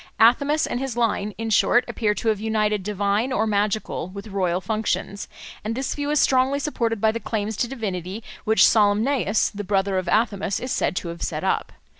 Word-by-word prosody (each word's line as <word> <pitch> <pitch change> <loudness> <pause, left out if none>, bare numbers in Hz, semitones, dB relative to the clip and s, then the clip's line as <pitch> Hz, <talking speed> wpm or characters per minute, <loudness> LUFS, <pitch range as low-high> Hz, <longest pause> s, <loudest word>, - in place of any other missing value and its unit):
Athamas 280 +7 +4
and 245 - -3
his 265 -3 -4
line, 210 -3 0
in 225 0 -3
short, 245 +3 +4
appear 210 -3 0
to 225 - -1
have 215 -2 +1
united 215 -1 0
divine 205 +4 0
or 220 -3 +1
magical 210 -3 -1
with 200 +3 -9
royal 185 -3 0
functions; 205 0 -2 0.4
and 220 +2 -2
this 265 +2 -2
view 290 0 -3
is 300 0 +2
strongly 265 +1 +3
supported 235 -6 -1
by 220 +1 +3
the 230 - -4
claims 220 -1 -3
to 240 - 0
divinity 205 -4 -5 0.2
which 220 +1 +5
Salmoneus, 215 +1 +2
the 205 0 -6
brother 195 -1 +1
of 185 -1 -4
Athamas, 200 -1 +1
is 255 - -5
said 160 - 0
to 175 - -3
have 170 0 -8
set - - -3
up. - - 0
215 Hz, 195 wpm, -23 LUFS, 200-235 Hz, 0.4 s, which